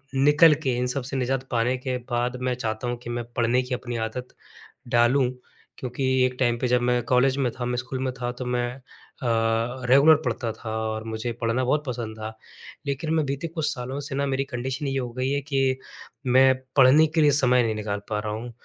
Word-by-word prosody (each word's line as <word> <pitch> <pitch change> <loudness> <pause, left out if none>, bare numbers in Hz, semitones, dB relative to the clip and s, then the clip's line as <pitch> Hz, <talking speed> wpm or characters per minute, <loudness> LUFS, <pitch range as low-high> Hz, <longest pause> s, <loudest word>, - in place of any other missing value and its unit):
निकल 150 +4 +6
के, 130 -4 +1
इन 125 0 0
सब 130 +1 -2
से 135 +2 -4
निज़ात 130 +1 -1
पाने 120 +1 +1
के 125 0 -3
बाद 120 +1 0
मैं 125 0 0
चाहता 115 0 -3
हूँ 120 - -2
कि 120 - -7
मैं 120 0 -2
पढ़ने 120 +2 +2
की 125 0 -5
अपनी 120 -1 -6
आदत 125 +2 -6 0.6
डालूँ। 125 +2 +3 0.5
क्योंकि 125 +1 -4 0.2
एक 125 - -3
टाइम 120 -2 +2
पे 125 - -1
जब 125 0 +3
मैं 125 0 +2
कॉलेज 130 +2 +3
में 130 -3 +1
था, 125 - -5
मैं 125 0 -1
स्कूल 130 +2 -4
में 130 -1 -1
था 120 0 -1
तो 130 - -4
मैं 120 0 0 0.5
अ, - - -2 0.6
रेगुलर 140 +5 +7
पढ़ता 115 - -2
था 110 0 -8 0.2
और 110 0 -4
मुझे 110 +1 -3
पढ़ना 120 +2 0
बहुत 150 +4 +1
पसंद 115 -3 -5
था। 110 0 -6 0.5
लेकिन 140 +3 -2
मैं 160 -1 +2
बीते 140 +4 -3
कुछ 160 -2 -2
सालों 130 +1 -5
से 140 -1 -6
न 140 0 0
मेरी 135 +1 0
कंडीशन 130 +2 -4
ये 135 0 -1
हो 125 -2 -3
गई 130 +1 0
है 140 0 0
कि 135 -2 0 0.5
मैं 130 +1 +6 0.2
पढ़ने 140 +4 +7
के 160 +1 0
लिए 150 - +6
समय 125 -3 +4
नहीं 110 -1 0
निकाल 105 -1 -3
पा 105 - 0
रहा 105 0 -4
हूँ। 115 +3 -5
125 Hz, 220 wpm, -25 LUFS, 120-135 Hz, 0.6 s, रेगुलर